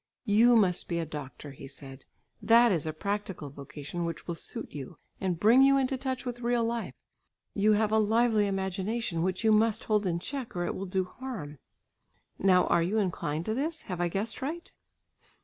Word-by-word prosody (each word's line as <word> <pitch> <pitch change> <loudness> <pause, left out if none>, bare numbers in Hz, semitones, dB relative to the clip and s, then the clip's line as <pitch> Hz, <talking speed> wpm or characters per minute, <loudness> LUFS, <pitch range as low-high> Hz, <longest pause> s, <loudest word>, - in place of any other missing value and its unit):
"You 235 +3 +5
must 190 -6 +2
be 170 - -2
a 165 - -1
doctor," 145 -1 -8
he 135 0 -10
said. 135 -1 -10 0.4
"That 235 0 +6
is 160 -4 0
a - - 0
practical 195 -3 -4
vocation 145 +4 -6
which 165 -1 -4
will 170 - -2
suit 165 - -7
you, 135 -3 -8 0.2
and 180 -4 -1
bring 230 +7 +6
you 275 0 +6
into 265 0 +1
touch 260 0 -3
with 245 -1 -4
real 240 0 +1
life. 230 0 -3 0.6
You 210 +1 +3
have 210 0 +2
a 220 - +4
lively 220 0 +3
imagination 190 0 -2
which 185 +4 -1
you 220 - +4
must 220 +1 +3
hold 210 -2 +1
in 170 -1 0
check, 250 +4 -5
or 175 0 -1
it - - -2
will 195 - -5
do 185 0 0
harm. 180 - -7 0.8
Now 185 -1 +4
are 170 - +3
you 185 +6 0
inclined 170 -5 -1
to 220 - -1
this? 310 +6 -2
Have 180 -2 -4
I 175 - +2
guessed 200 +8 -2
right?" 320 +6 -5
200 Hz, 195 wpm, -29 LUFS, 170-230 Hz, 0.8 s, That